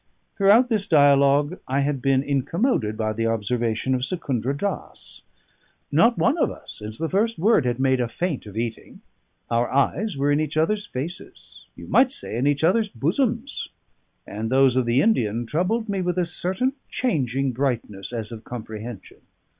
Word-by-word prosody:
Throughout 215 Hz, +5 st, +5 dB
this 210 Hz, -4 st, 0 dB
dialogue 145 Hz, 0 st, +4 dB
I 135 Hz, +2 st, +1 dB
had 140 Hz, -2 st, -1 dB
been 135 Hz, 0 st, +2 dB
incommoded 140 Hz, -, 0 dB
by 110 Hz, -1 st, -1 dB
the 115 Hz, +1 st, -1 dB
observation 115 Hz, +2 st, -1 dB
of 130 Hz, -, 0 dB
Secundra 135 Hz, -, -2 dB
Dass. 200 Hz, +5 st, -5 dB, 0.7 s
Not 235 Hz, +1 st, +4 dB
one 280 Hz, +8 st, +2 dB
of -, -, +3 dB
us, -, -, -10 dB
since 110 Hz, +1 st, -7 dB
the 165 Hz, -, -2 dB
first 215 Hz, +6 st, 0 dB
word, 190 Hz, -, +3 dB
had 120 Hz, 0 st, -1 dB
made 130 Hz, -1 st, +2 dB
a 120 Hz, -, -1 dB
feint 160 Hz, -5 st, -3 dB
of 105 Hz, +1 st, -9 dB
eating: 115 Hz, -1 st, -5 dB, 0.5 s
our 120 Hz, +1 st, +1 dB
eyes 150 Hz, +8 st, 0 dB
were 140 Hz, +1 st, +1 dB
in 145 Hz, -, +2 dB
each 155 Hz, 0 st, -2 dB
other's 205 Hz, +6 st, +1 dB
faces 165 Hz, +8 st, -8 dB
you -, -, -10 dB
might 255 Hz, 0 st, +4 dB
say, 265 Hz, -, -4 dB
in 125 Hz, +4 st, +1 dB
each 145 Hz, +1 st, +1 dB
other's 210 Hz, +6 st, +3 dB
bosoms; 230 Hz, -, -1 dB, 0.6 s
and 110 Hz, +2 st, -4 dB
those 130 Hz, 0 st, +4 dB
of 130 Hz, -2 st, +1 dB
the 120 Hz, +4 st, +3 dB
Indian 120 Hz, -, +1 dB
troubled 185 Hz, -, -1 dB
me 200 Hz, -2 st, -1 dB
with 180 Hz, 0 st, -1 dB
a 180 Hz, -, +2 dB
certain 190 Hz, +9 st, -1 dB, 0.2 s
changing 135 Hz, -, 0 dB
brightness, 115 Hz, -6 st, -3 dB
as 115 Hz, -3 st, -4 dB
of 115 Hz, -1 st, -8 dB
comprehension. 110 Hz, -2 st, -8 dB
140 Hz, 170 wpm, -23 LUFS, 120-185 Hz, 0.7 s, Throughout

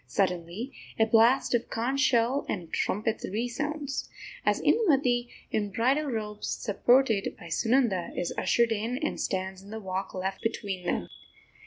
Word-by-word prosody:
Suddenly 185 Hz, +6 st, -1 dB, 0.2 s
a 220 Hz, -, +5 dB
blast 230 Hz, +5 st, +4 dB
of 240 Hz, -, +1 dB
conch 250 Hz, +5 st, -1 dB
shell 255 Hz, 0 st, +3 dB
and 175 Hz, -5 st, -4 dB
trumpet 215 Hz, +2 st, -1 dB
resounds, 280 Hz, +6 st, -3 dB, 0.3 s
as -, -, +2 dB
Indumati, 265 Hz, -, +3 dB, 0.2 s
in 205 Hz, -1 st, 0 dB
bridal 260 Hz, +9 st, +2 dB
robes, 210 Hz, -4 st, -3 dB
supported 240 Hz, 0 st, +2 dB
by 170 Hz, -, -10 dB
Sunanda, 225 Hz, 0 st, +2 dB
is 175 Hz, -, -1 dB
ushered 235 Hz, -1 st, +2 dB
in 225 Hz, +3 st, -1 dB
and 305 Hz, +3 st, -2 dB
stands 190 Hz, -1 st, -2 dB
in 200 Hz, -, -14 dB
the 220 Hz, +1 st, -5 dB
walk 190 Hz, -1 st, -4 dB
left 190 Hz, +1 st, -3 dB
between 200 Hz, -5 st, -3 dB
them. 85 Hz, -, -1 dB
225 Hz, 145 wpm, -28 LUFS, 195-250 Hz, 0.3 s, a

